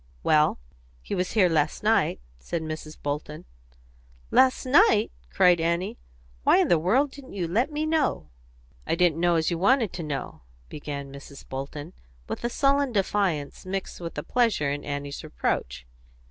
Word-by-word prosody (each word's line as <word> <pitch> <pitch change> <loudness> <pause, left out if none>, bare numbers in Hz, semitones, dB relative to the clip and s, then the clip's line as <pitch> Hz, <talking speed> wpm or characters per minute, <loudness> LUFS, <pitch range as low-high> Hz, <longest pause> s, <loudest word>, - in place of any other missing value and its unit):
"Well, 155 0 +3 0.5
he - - -5
was 180 0 -1
here 205 -4 +5
last 155 -3 0
night," - - +2 0.2
said 160 - -4
Mrs. 155 0 -6
Bolton. 150 +1 -4 0.9
"Last 260 0 +4
night!" 260 - +4 0.2
cried 180 -3 +4
Annie. 170 +7 -1 0.4
"Why - - +5
in - - +3
the 170 - +4
world 255 - +2
didn't 275 -1 -12
you 180 -4 -2
let 235 - +1
me 300 +1 -1
know?" 310 - 0 0.6
"I - - +1
didn't 170 -2 +2
know 175 0 +3
as 160 +1 +1
you 170 - -2
wanted 230 +1 +3
to 175 - -5
know," 145 -5 -5 0.3
began 140 -2 -6
Mrs. 140 0 -12
Bolton, 145 +5 -6 0.3
with - - -5
a 240 - 0
sullen 275 +1 +2
defiance 195 -8 -1
mixed 190 -1 -5
with 170 -1 -6
pleasure 230 - +2
in 145 0 -4
Annie's 145 0 -5
reproach. - - -3
170 Hz, 160 wpm, -26 LUFS, 150-225 Hz, 0.9 s, here